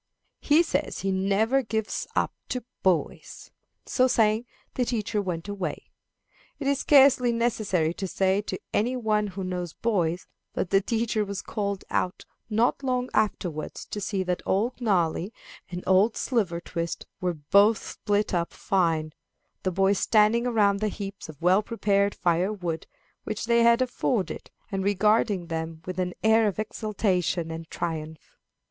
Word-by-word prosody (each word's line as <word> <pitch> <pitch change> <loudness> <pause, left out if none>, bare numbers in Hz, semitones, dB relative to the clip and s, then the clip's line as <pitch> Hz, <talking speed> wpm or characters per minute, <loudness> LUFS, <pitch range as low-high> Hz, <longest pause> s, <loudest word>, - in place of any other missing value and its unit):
He 305 +3 +4
says - - -2
he 195 - 0
never 200 +7 +2
gives 220 -3 -3
up - - +1 0.2
to 250 - -3 0.2
boys." 185 -4 -1 0.3
So 255 0 +3
saying, 220 -1 +2 0.3
the 255 - 0
teacher 220 -3 -1
went 175 -2 -4
away. 200 -3 -5 0.7
It 285 - -6
is 280 0 +2
scarcely 265 -4 +5
necessary 215 -8 0
to 190 +2 -4
say 190 +2 +1
to - - -5
any 245 +5 +1
one 215 -3 +1
who 190 0 -6
knows 180 -2 -4
boys 180 -6 0 0.3
that 175 - -2
the 195 0 +5
teacher 225 0 0
was 200 -1 -5
called 200 -2 -3
out 180 +2 -1 0.2
not 230 +5 +2
long 255 -2 -1
afterwards 180 -7 -1
to 205 - -3
see 195 -1 -1
that 180 -1 -2
Old 235 +6 0
Gnarly 185 -3 +1 0.4
and 180 0 -6
Old 190 +4 +4
Slivertwist 170 -7 -2
were 180 -1 -1
both 200 +9 +4
split 205 0 -1
up 170 -1 -1
fine 165 -5 0 0.5
the 185 - 0
boys 195 +2 +2
standing 225 +2 +3
around 205 -4 +3
the 215 - 0
heaps 200 -3 -6
of 150 -3 -11
well 185 +3 +5
prepared 200 -2 +1
fire 175 +3 +1
wood 175 -6 -4 0.4
which 215 - -4
they 235 0 +3
had 235 +2 +5
afforded, 245 -4 -2 0.2
and 195 -1 -1
regarding 205 -1 +2
them 160 -1 -5
with 185 0 -5
an 180 -1 -2
air 220 0 +5
of 200 - -2
exultation 190 -6 -1
and 165 0 -7
triumph. 160 -2 -5
200 Hz, 155 wpm, -26 LUFS, 180-220 Hz, 0.7 s, scarcely